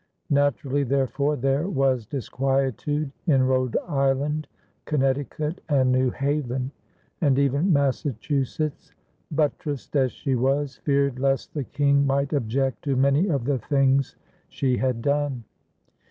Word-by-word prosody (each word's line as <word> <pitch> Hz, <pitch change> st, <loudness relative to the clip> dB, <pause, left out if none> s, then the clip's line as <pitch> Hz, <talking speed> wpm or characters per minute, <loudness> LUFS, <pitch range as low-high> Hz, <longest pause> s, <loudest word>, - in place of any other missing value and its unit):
Naturally, 140 Hz, 0 st, +1 dB
therefore, 140 Hz, +2 st, 0 dB
there 135 Hz, +6 st, 0 dB
was 135 Hz, -, +1 dB
disquietude 135 Hz, +2 st, -1 dB, 0.2 s
in 135 Hz, -5 st, +4 dB
Rhode 130 Hz, -1 st, +1 dB
Island, 140 Hz, 0 st, 0 dB, 0.4 s
Connecticut, 145 Hz, +3 st, -1 dB
and 130 Hz, -3 st, +3 dB
New 130 Hz, 0 st, +3 dB
Haven; 135 Hz, -2 st, -2 dB, 0.5 s
and 140 Hz, -5 st, +3 dB
even 140 Hz, +6 st, +2 dB
Massachusetts, 140 Hz, +1 st, -1 dB, 0.4 s
buttressed 150 Hz, -2 st, -2 dB
as 130 Hz, -3 st, +3 dB
she 135 Hz, -, -3 dB
was, 135 Hz, +3 st, 0 dB
feared 140 Hz, -3 st, 0 dB
lest 135 Hz, 0 st, 0 dB
the 145 Hz, -4 st, -3 dB
King 140 Hz, 0 st, +2 dB
might 140 Hz, +1 st, 0 dB
object 135 Hz, 0 st, -1 dB
to 140 Hz, -2 st, +1 dB
many 140 Hz, +7 st, +3 dB
of 140 Hz, -9 st, 0 dB
the 135 Hz, -1 st, 0 dB
things 135 Hz, -1 st, +1 dB, 0.3 s
she 130 Hz, -3 st, 0 dB
had 125 Hz, -3 st, -1 dB
done. 140 Hz, -4 st, 0 dB
140 Hz, 125 wpm, -24 LUFS, 130-145 Hz, 0.5 s, in